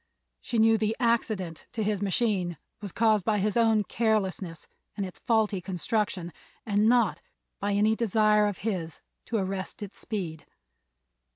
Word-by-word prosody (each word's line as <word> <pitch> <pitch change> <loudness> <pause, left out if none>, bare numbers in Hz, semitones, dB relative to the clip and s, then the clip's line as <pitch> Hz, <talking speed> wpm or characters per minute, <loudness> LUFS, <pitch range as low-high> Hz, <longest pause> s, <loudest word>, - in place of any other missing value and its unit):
She 235 - -3
knew 225 0 +5
the 215 +1 0
accident 220 -8 0
to 220 - -1
his 205 -1 0
machine 195 -4 0 0.2
was 200 -3 -5
caused 215 -1 +3
by 210 +2 +1
his 205 +1 0
own 225 -2 +4
carelessness 195 -6 -1 0.3
and 200 - -1
its 185 - -9
faulty 215 -4 +2
construction, 185 -1 -2 0.3
and 210 +1 +3
not 235 -5 +3 0.4
by 200 0 0
any 210 +2 +3
desire 215 -1 +3
of 205 -3 -3
his 175 -7 -3 0.3
to 230 - 0
arrest 195 +1 -3
its 200 - -9
speed. 175 -8 -5
210 Hz, 150 wpm, -28 LUFS, 190-220 Hz, 0.4 s, knew